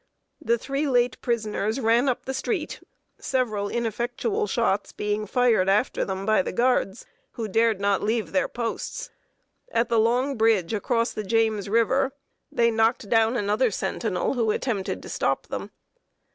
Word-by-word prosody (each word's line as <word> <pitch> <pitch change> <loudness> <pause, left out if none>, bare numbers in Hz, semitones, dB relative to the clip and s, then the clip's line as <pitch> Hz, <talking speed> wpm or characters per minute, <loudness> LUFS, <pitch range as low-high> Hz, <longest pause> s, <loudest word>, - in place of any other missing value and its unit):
The 235 -5 +2
three 275 +5 -2
late 245 -2 +1
prisoners 220 -1 -1
ran 235 +3 +3
up 250 - -2
the 265 - -3
street, 310 - -3 0.4
several 215 -6 -1
ineffectual 240 - -2
shots - - 0
being 210 0 -2
fired 230 -5 +3
after 210 +6 +2
them 190 0 -4
by 215 -2 +3
the - - -4
guards, 235 -2 +1 0.3
who 225 -2 -4
dared 225 0 +2
not 200 0 +1
leave 220 +1 -1
their 280 - +1
posts. 240 - -4 0.6
At 230 +1 +1
the 230 -1 +3
long 250 +4 +1
bridge 220 -5 +2
across 230 +2 0
the 215 - -4
James 220 -1 +1
River 260 +5 +2 0.4
they 235 0 +3
knocked 225 0 +1
down 225 +1 +3
another 210 +4 +1
sentinel, 205 0 -2
who 235 -4 0
attempted 210 -3 -2
to - - -9
stop - - -1
them. - - -5
230 Hz, 155 wpm, -25 LUFS, 215-250 Hz, 0.6 s, ran